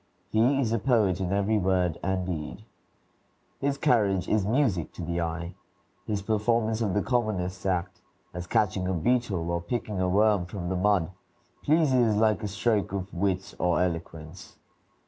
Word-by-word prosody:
He 110 - +2 0.2
is 120 -5 0
a 115 - +1
poet 105 -7 +2
in 90 - -1
very 100 +3 +1
word 90 -3 +1
and 95 0 -1
deed. 90 +4 -5 0.9
His 140 0 -1
carriage 100 -8 +2
is 105 -2 +1
music 110 - +1
to 90 - -7
the 85 +1 -2
eye. 85 +1 -4 0.5
His 105 -2 -2
performance 110 +1 +1
of 105 -4 0
the 105 - +1
commonest 100 -7 -1
act, 90 0 -2 0.3
as 90 0 -6
catching 100 -3 +1
a 95 - 0
beetle, 95 -4 0
or 85 0 -1
picking 105 +1 -3
a 90 - +1
worm 100 -1 +3
from 90 -2 -5
the 95 - -1
mud, 95 -2 +2 0.5
pleases 130 -8 +3
like 110 0 +2
a 105 - -2
stroke 100 +1 0
of 95 0 -4
wit 95 +1 -1
or 90 -1 +2
eloquence. 85 -1 -4
95 Hz, 165 wpm, -27 LUFS, 90-110 Hz, 0.9 s, worm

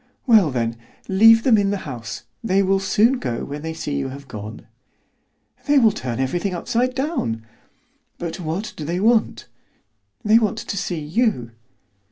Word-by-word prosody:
"Well, 215 - +5
then, 115 -3 -2 0.3
leave 225 +4 +6
them 230 -5 +5
in 200 -1 +1
the 200 - 0
house. 120 -4 -6 0.2
They 195 -2 +2
will 195 0 +2
soon 225 +6 +2
go 120 -3 -3
when 145 +1 -6
they 160 +1 -5
see 145 -3 -3
you 135 - -2
have 140 +1 -10
gone." 110 -2 -8 1.0
"They 290 0 +4
will 230 -5 +6
turn 125 - -4
everything 175 +8 -1
upside 245 +8 -1
down." 260 - -2 0.7
"But 170 +1 -5
what 175 +5 -4
do 155 - -6
they 170 +4 -2
want?" 225 +2 +2 0.8
"They 215 +2 +6
want 215 -4 0
to - - -5
see 180 -3 -2
you." 150 - 0
180 Hz, 165 wpm, -21 LUFS, 135-220 Hz, 1.0 s, leave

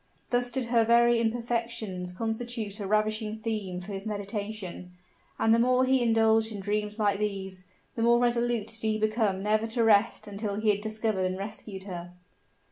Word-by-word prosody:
Thus 245 0 +2
did 250 +1 -1
her 235 -2 +4
very 235 +1 +5
imperfections 230 -5 -2
constitute 225 +1 -3
a 200 - -3
ravishing 215 +1 0
theme 210 -5 -3
for 185 +3 -7
his 195 +2 -4
meditation; 205 -3 -5 0.4
and 225 - +3
the 230 - +4
more 255 +2 +4
he 260 0 +3
indulged 225 -1 +3
in 210 - -6
dreams 210 +1 -2
like 205 -2 +1
these, 190 -3 -3 0.3
the 230 - -4
more 235 +1 +5
resolute 240 -2 +1
did 225 0 -4
he 220 -1 +1
become 215 -3 0
never 215 +2 +1
to 230 +1 0
rest 215 0 +3
until 205 0 -4
he 215 +1 +3
had 205 0 -2
discovered 215 -3 -1
and 185 0 -3
rescued 200 -1 -6
her. 175 -2 -7
215 Hz, 175 wpm, -28 LUFS, 200-230 Hz, 0.4 s, very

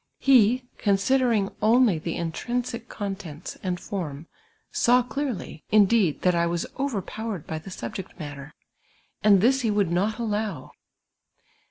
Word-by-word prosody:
He, 250 -2 +4 0.2
consideiiug 210 +1 +2
only 225 -5 +4
the 165 +1 -4
intrinsic 235 +8 -3
contents 195 -6 -6
and 180 -2 -2
form, 160 -7 -5 0.5
saw 245 +1 +4
clearly, 255 - -4
indeed, 210 -5 +4
that 180 - +4
I 170 0 +2
was 170 0 -1
overpowered 220 - -3
by 160 - -4
the 175 - -11
subject 180 +3 -7
matter, 145 -2 -7 0.7
and 200 -3 +6
this 265 +5 +4
he 230 - 0
would 205 -4 +1
not 200 +5 0
allow. 215 -2 -3
205 Hz, 130 wpm, -25 LUFS, 175-235 Hz, 0.7 s, and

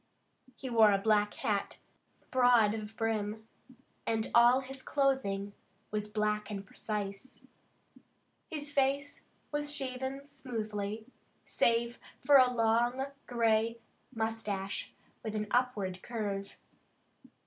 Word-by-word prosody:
He 265 - -7
wore 225 -4 +6
a 200 - +4
black 210 0 +2
hat, 210 -6 -1 0.5
broad 245 -4 +5
of 215 0 -6
brim, 220 -1 -2 0.6
and 225 -1 0
all 240 +2 +6
his 265 0 -8
clothing 250 -9 0 0.4
was 210 0 -2
black 210 0 -1
and 200 -1 -5
precise. 205 +3 -5 1.1
His 295 -3 -5
face 280 +1 0 0.3
was 295 0 0
shaven 265 0 -3
smoothly, 220 -6 -4 0.4
save 235 +1 +1 0.2
for 285 -1 +6
a 255 -1 +6
long 240 +3 +1 0.2
gray 230 -1 +2 0.3
mustache 220 -4 -3 0.3
with 220 -1 -4
an 210 0 -1
upward 210 -7 0
curve. 200 -4 -4
225 Hz, 105 wpm, -32 LUFS, 210-260 Hz, 1.1 s, wore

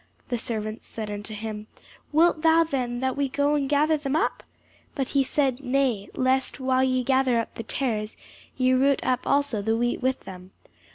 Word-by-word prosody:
The 245 -2 -1
servants 215 -1 -4
said 215 -2 -6
unto 205 +1 -4
him, 215 0 -6 0.4
Wilt 320 +1 +3
thou 325 0 +5
then 250 -6 -2
that 260 -1 0
we 280 -1 0
go 285 +2 +1
and 280 -2 0
gather 300 +2 +3
them 285 -1 -2
up? 320 - 0 0.5
But 270 -3 -2
he 275 -1 +2
said, 265 -2 0
Nay; 250 -6 0
lest 260 +2 +1
while 260 0 +2
ye 255 -1 +1
gather 260 -1 +2
up 230 - -4
the - - -6
tares, 220 -2 -2 0.4
ye 255 0 +3
root 270 +1 +3
up 255 -1 0
also 280 -6 +1
the 225 +2 0
wheat 240 +2 0
with 260 +1 0
them. 185 0 -11
260 Hz, 185 wpm, -25 LUFS, 225-280 Hz, 0.5 s, thou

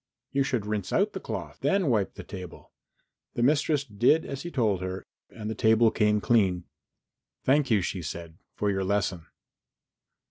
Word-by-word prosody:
"You 140 - +1
should 130 -6 0
rinse 105 -3 -3
out 205 +2 +2
the 190 - -4
cloth, - - -6
then 195 -2 +2
wipe 110 -8 +1
the - - -8
table." 90 -4 -10 0.6
The 120 - 0
mistress 145 +1 +2
did 125 +6 +2
as 140 -1 -5
he 175 - -5
told 110 - +1
her 95 +1 -5 0.2
and 105 -2 -8
the 110 - -2
table 110 0 +4
came 105 -1 +2
clean. 95 -6 +2 0.8
"Thank 140 +1 +3
you," 105 -5 +3
she 90 +1 -3
said, 85 0 -7 0.2
"for 105 -1 0
your 95 -1 -1
lesson." 95 -3 -1
110 Hz, 170 wpm, -27 LUFS, 95-135 Hz, 0.8 s, table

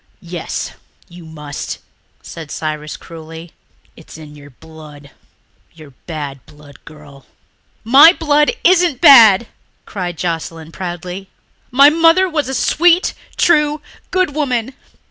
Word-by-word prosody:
"Yes, 170 -1 -6 0.4
you 175 -1 -14
must," 150 -2 -7 0.5
said 160 -3 -10
Cyrus 155 0 -5
cruelly. 165 0 -12 0.4
"It's 160 - -14
in 150 -2 -13
your 145 -1 -15
blood... 150 0 -15 0.6
your 155 -3 -15 0.2
bad 145 -5 -7
blood, 145 -2 -18
girl." 145 -3 -16 0.6
"My 275 +8 +7
blood 300 -4 +1
isn't 350 -6 +2
bad," 235 - +7 0.4
cried 180 -4 -6
Joscelyn 165 -1 -5
proudly. 180 +2 -7 0.4
"My 275 +4 +5
mother 330 +4 +3
was 305 -6 -3
a 265 - -3
sweet, 335 +9 +2 0.2
true, 300 -2 +2 0.3
good 370 -5 -1
woman. 260 -4 -2
175 Hz, 115 wpm, -16 LUFS, -, 0.6 s, My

